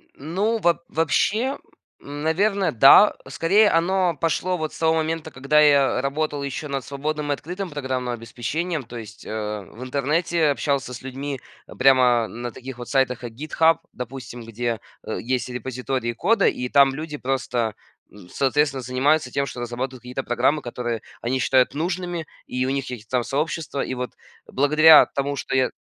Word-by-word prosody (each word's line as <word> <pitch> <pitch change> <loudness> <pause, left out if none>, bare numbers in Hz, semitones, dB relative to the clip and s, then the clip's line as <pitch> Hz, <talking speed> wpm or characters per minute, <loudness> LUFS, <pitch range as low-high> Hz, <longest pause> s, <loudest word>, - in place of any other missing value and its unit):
Ну, 200 +10 -1
во 170 -4 +2
вообще, 215 - +1 0.4
наверно, 165 +8 0
да. 135 - +7
Скорее 205 +6 +3
оно 175 +1 +2
пошло 170 +4 0
вот 155 -2 -3
с - - -10
того 160 0 +2
момента, 160 0 -2
когда 140 +4 +2
я 140 -4 +4
работал 145 +1 -2
еще 140 +2 -4
над 135 -2 -3
свободным 145 +1 -3
и - - +3
открытым 180 +6 -5
программным 130 -3 -3
обеспечением, 135 +8 -3
то 120 0 -12
есть, 110 -1 -10
э, - - -8 0.3
в 115 +5 -11
интернете 155 +5 0
общался 140 -3 -1
с 120 - -8
людьми 135 +1 -5 0.4
прямо 125 -4 +5
на 120 +2 -6
таких 130 +2 -9
вот 120 - -8
сайтах, 130 -3 +1
как 120 -2 -7
"Гитхаб", 155 +5 +2 0.2
допустим. 125 -1 -7
Где, 115 0 -3 0.3
э, - - -3
есть 125 +1 -2
репозитории 125 0 -3
кода, 195 - +2
и 125 0 -1
там 140 0 +5
люди 150 +1 -5
просто, 125 -4 -1 0.4
н 95 -4 -15
соответственно, 135 +1 +1
занимаются 130 +2 +1
тем, 140 - 0
что 120 - -7
разрабатывают 125 +1 -4
какие-то 125 +2 -5
программы, 130 +5 +1
которые 120 -2 -4 0.2
они 130 +3 -1
считают 130 +1 +3
нужными, 175 +1 -3 0.2
и 125 0 -2
у - - 0
них 135 0 -1
какие-то 120 -4 -8
там 125 -2 +1
сообщества. 150 +1 -2
И 130 - -4
вот 125 -2 -4 0.3
благодаря 155 +3 +6
тому, 140 0 -1
что 135 - -3
я 130 -1 +2
140 Hz, 165 wpm, -23 LUFS, 125-160 Hz, 0.4 s, да